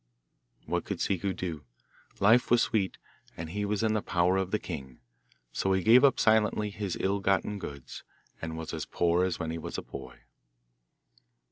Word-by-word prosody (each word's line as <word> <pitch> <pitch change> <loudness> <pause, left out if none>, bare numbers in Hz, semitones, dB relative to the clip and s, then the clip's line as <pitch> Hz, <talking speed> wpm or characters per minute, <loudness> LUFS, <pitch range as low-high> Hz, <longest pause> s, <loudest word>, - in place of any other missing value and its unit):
What - - -1
could - - -4
Ciccu 100 0 0
do? 80 -5 -4 0.6
Life 110 +5 +5
was 120 0 +5
sweet, 100 -4 0 0.4
and 80 -1 -6
he 105 +2 -2
was 105 +1 -1
in 110 -1 +2
the 110 - +1
power 90 0 +2
of 95 -1 0
the 105 - +1
king; 70 - -7 0.5
so 95 - +1
he 95 -1 +1
gave 120 +6 +7
up 140 - +5
silently 105 -1 +3
his 100 -3 -4
ill 100 +1 +1
gotten 100 +1 0
goods, 70 -7 -8 0.4
and 80 0 -4
was 80 -1 -6
as - - -4
poor 85 +1 +2
as 90 -2 0
when 80 -2 -3
he 85 - -4
was - - -5
a - - -4
boy. - - -10
95 Hz, 180 wpm, -29 LUFS, 85-105 Hz, 0.6 s, gave